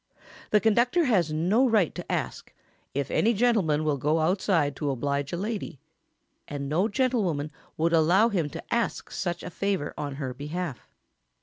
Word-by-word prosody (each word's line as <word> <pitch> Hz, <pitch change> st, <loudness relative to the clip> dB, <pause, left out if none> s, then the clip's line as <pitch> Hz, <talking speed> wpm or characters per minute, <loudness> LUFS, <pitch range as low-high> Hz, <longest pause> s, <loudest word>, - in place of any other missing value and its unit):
] -, -, -19 dB
The 210 Hz, -, +4 dB
conductor 240 Hz, +10 st, +3 dB
has 190 Hz, -, +2 dB
no 195 Hz, +12 st, +2 dB
right 210 Hz, -8 st, +3 dB
to -, -, -6 dB
ask -, -, -4 dB, 0.4 s
"if 140 Hz, -1 st, -2 dB
any 230 Hz, +2 st, +2 dB
gentleman 195 Hz, -10 st, +2 dB
will 150 Hz, -2 st, +1 dB
go 150 Hz, +4 st, +1 dB
outside 165 Hz, -3 st, +1 dB
to 150 Hz, -, -1 dB
oblige 140 Hz, +1 st, -1 dB
a 175 Hz, -, -2 dB
lady"; 205 Hz, -, -4 dB, 0.7 s
and 140 Hz, -1 st, -4 dB
no 170 Hz, +8 st, +2 dB
gentlewoman 200 Hz, -, 0 dB, 0.3 s
would 165 Hz, +1 st, +1 dB
allow 175 Hz, +8 st, +5 dB
him 170 Hz, -8 st, 0 dB
to -, -, -7 dB
ask 235 Hz, 0 st, -1 dB
such 175 Hz, -2 st, -3 dB
a 180 Hz, -, -6 dB
favour 195 Hz, -5 st, -1 dB
on 145 Hz, -2 st, -4 dB
her 135 Hz, -3 st, -4 dB
behalf. 150 Hz, +2 st, -5 dB
170 Hz, 170 wpm, -27 LUFS, 145-210 Hz, 0.7 s, allow